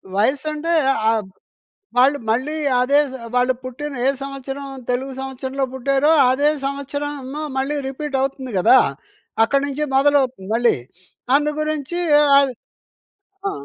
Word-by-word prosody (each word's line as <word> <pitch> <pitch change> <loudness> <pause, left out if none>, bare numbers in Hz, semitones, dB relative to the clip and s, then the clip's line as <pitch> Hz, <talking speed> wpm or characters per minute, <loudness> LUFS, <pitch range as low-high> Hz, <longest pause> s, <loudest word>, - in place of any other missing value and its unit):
వయస్సంటే 300 +9 0 0.4
ఆహ్, 225 -1 +1 0.7
వాళ్ళు 270 +3 +5
మళ్ళీ 260 +7 0 0.3
అదే 280 +3 +4
జ్ - - -10 0.2
వాళ్ళు 250 +1 +3
పుట్టిన 280 +4 -6
ఏ - - +5
సంవత్సరం, 275 0 -6 0.2
తెలుగు 260 +2 -1
సంవత్సరంలో 265 0 -4
పుట్టారో 275 +3 +2 0.2
అదే 285 +3 +2 0.2
సంవత్సరంమో 280 0 -4 0.2
మళ్ళీ 275 +3 -1
రిపీట్ 275 +1 -4
అవుతుంది 265 -1 -3
కదా! 220 +8 +6 0.7
అక్కడి 275 +5 +1
నుంచి 285 +2 -3
మొదలవుతుంది 270 -7 +2
మళ్ళీ. 240 0 +3 0.6
అందు 295 +1 +2
గురించి 305 +1 -3 0.2
ఏ - - +5 0.2
ఆద్ 275 -2 +1 1.0
ఆ! - - -1
275 Hz, 125 wpm, -20 LUFS, 260-290 Hz, 1.0 s, కదా